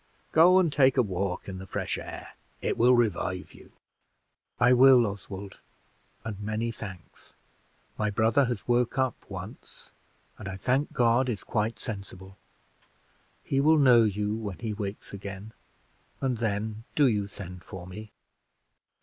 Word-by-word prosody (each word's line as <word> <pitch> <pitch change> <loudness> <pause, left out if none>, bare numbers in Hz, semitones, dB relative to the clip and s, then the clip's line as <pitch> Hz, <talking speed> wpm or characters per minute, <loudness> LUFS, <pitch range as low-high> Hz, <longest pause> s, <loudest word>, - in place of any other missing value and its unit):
Go 175 +3 +6
and 170 -5 +3
take 135 -2 +4
a 125 - +5
walk 95 -2 -3
in 95 -1 -6
the 95 - -9
fresh - - -2
air - - -8 0.3
it - - -1
will 125 +2 +5
revive 95 -5 -1
you." - - -16 0.9
"I 120 +1 +5
will, 125 -1 +7
Oswald, 100 -1 -7 0.6
and 110 -3 -6
many 110 +3 -2
thanks. 95 -6 -11 0.6
My 105 0 +1
brother 110 +7 +3
has 120 -5 -4
woke 120 +1 +1
up 130 -3 +2 0.2
once, - - -9 0.5
and, 105 - -7
I 95 0 -5
thank 130 +8 0
God, 120 +2 +2
is 110 -5 -3
quite 110 +1 -1
sensible. 95 -4 -8 1.1
He 135 - 0
will 155 +2 +5
know 125 -5 +6
you 105 0 0
when 105 -4 -5
he 110 -3 -4
wakes 100 -1 -6
again, 100 +1 -7 0.7
and 130 -3 -1
then 110 0 -2
do 145 - +5
you 105 -5 +1
send 90 -2 -9
for 90 -2 -9
me." 105 +4 -9
110 Hz, 150 wpm, -28 LUFS, 100-125 Hz, 1.1 s, will